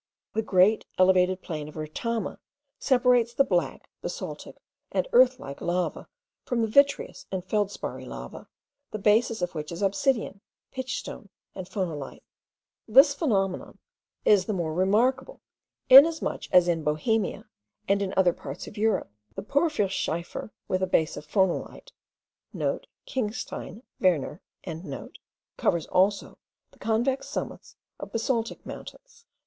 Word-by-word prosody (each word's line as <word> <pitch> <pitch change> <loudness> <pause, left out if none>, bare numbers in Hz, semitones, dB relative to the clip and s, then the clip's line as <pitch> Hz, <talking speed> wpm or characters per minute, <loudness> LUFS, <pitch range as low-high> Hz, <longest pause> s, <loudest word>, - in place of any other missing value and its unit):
The 220 - +1
great 205 +1 +3
elevated 185 0 +3
plain 155 -3 -5
of - - -14
Retama 195 +8 -3 0.4
separates 245 -2 +3
the 275 - +5
black, 180 -9 -1
basaltic, - - -6 0.3
and - - 0
earthlike 255 - +3
lava, 175 +1 -2 0.4
from 235 -2 0
the - - +1
vitreous 280 - +2
and 190 -1 -3
feldsparry 205 0 -2
lava, - - -9 0.4
the - - -5
basis 220 0 +2
of 180 - -2
which 150 -1 -5
is 170 +4 -4
obsidian, 200 0 0 0.3
pitch 260 -1 -3
stone, 205 - -8 0.2
and 185 -1 -8
phonolite. 170 -8 -4 0.6
This 270 +6 +7
phenomenon 200 - -1 0.5
is 200 -3 +5
the 215 - -2
more 165 -3 -2
remarkable, 225 +9 +1 0.5
inasmuch 305 +5 +6
as 180 -1 +6
in 165 -2 0
Bohemia 195 +8 0 0.4
and 200 +1 +2
in 195 -1 -1
other 180 -2 +4
parts 135 0 -8
of 205 - -10
Europe, 220 - +1 0.2
the - - -5
porphyrschiefer 205 - -1 0.2
with 185 0 0
base 160 - +2
of 150 - -9
phonolite* 190 - -1 0.4
(* - - -24 0.5
Klingstein. 230 -1 -4 0.2
Werner.) 170 -3 +1 1.2
covers 170 -2 +1
also 195 +2 +1 0.3
the - - -23
convex 240 +4 0
summits - - -6 0.2
of - - -8
basaltic 230 0 -2
mountains. - - -11
205 Hz, 125 wpm, -27 LUFS, 180-245 Hz, 1.2 s, This